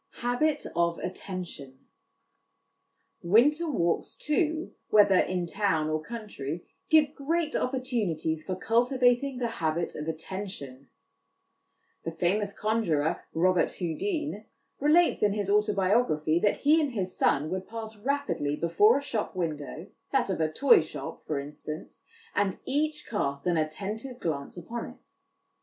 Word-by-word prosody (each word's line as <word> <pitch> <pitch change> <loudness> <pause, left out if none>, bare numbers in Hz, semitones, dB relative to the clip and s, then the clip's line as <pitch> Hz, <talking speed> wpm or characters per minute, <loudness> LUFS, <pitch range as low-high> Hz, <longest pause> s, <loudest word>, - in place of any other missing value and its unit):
Habit 285 +5 +1
of 170 0 +2
Attention. 180 -8 -6 1.4
Winter 285 - +4
walks, 170 - 0
too, 315 +1 0 0.2
whether 205 -3 +6
in 180 -1 0
town 170 -5 0
or 155 0 0
country, 175 - -6 0.2
give 305 -2 +5
great 315 +2 -1
opportunities 210 - -1
for 185 - -3
cultivating 245 +5 +2
the 245 -1 0
habit 165 +1 0
of 150 +1 -6
attention. 160 -5 -6 1.1
The - - -2
famous 195 +5 0
con 220 +3 0
jurer, 160 -2 0
Robert 180 +2 +2
Houdin, 220 - -3 0.3
relates 315 +5 +4
in 205 -1 +3
his 200 -1 -1
autobiography, 200 -6 +2
that 205 - +1
he 310 +3 +5
and 285 -4 -1
his 185 -4 -2
son 150 +3 +2
would 190 0 -3
pass 225 -1 -6
rapidly 215 - -1
before 170 - +4
a 280 - -3
shop 220 -8 -3
window, 160 -2 -3 0.3
that 265 -7 +2
of 180 - -1
a 155 -1 +1
toy 270 - +6
shop, 150 -3 -8
for 150 -3 -1
instance, 150 +2 -8 0.3
and 195 -2 +1
each 300 +2 -1
cast 140 -10 -2
an 175 -1 +2
attentive 205 +11 -3
glance 145 -1 -3
upon 230 +7 -5
it. - - -18
200 Hz, 135 wpm, -28 LUFS, 160-250 Hz, 1.4 s, whether